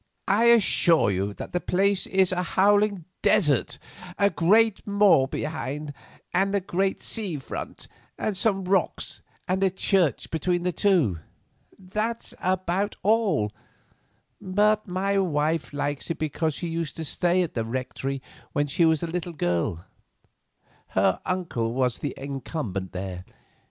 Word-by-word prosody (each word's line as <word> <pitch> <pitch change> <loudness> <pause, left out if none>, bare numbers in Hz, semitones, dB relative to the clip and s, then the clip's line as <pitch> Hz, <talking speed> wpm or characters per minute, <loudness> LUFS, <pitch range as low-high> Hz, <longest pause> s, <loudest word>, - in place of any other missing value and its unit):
"I 205 +4 +3
assure 190 - +5
you 100 +2 -1
that - - -8
the 180 - 0
place 195 +1 +1
is 190 -1 +3
a 180 -1 0
howling 200 0 +2 0.2
desert; 150 - +2 0.4
a 200 0 +3
great 210 +7 +3
moor 200 -9 +4
behind, 150 0 -4 0.4
and 195 +3 +2
the - - +3
great 190 +1 -1
sea 205 -8 -2
in - - -4
front, 135 - -7 0.3
and 210 - -2
some 195 -1 +1
rocks 185 -2 0 0.3
and 185 +1 0
the 195 - +4
church 185 -3 +1
between 175 +2 0
the 180 - +1
two. 170 - +2 0.6
That's 215 +5 -3
about 185 +2 -1
all, 205 - +2 0.9
but 210 +3 +2
my 195 +2 0
wife 160 -3 0
likes 145 0 -3
it 165 - -2
because 155 0 -1
she 175 - -4
used 165 -3 -3
to 160 - -5
stay 180 +4 +1
at 170 - -5
the 115 - -1
rectory 130 +3 -4 0.3
when 145 - +1
she 150 +4 +2
was 160 -1 +2
a - - +1
little 175 +1 -4
girl. 85 - -1 1.1
Her - - +3
uncle 165 -12 -2
was 125 -2 0
the 145 - -4
incumbent 135 - -5
there. 90 -1 -5
175 Hz, 145 wpm, -25 LUFS, 145-195 Hz, 1.1 s, assure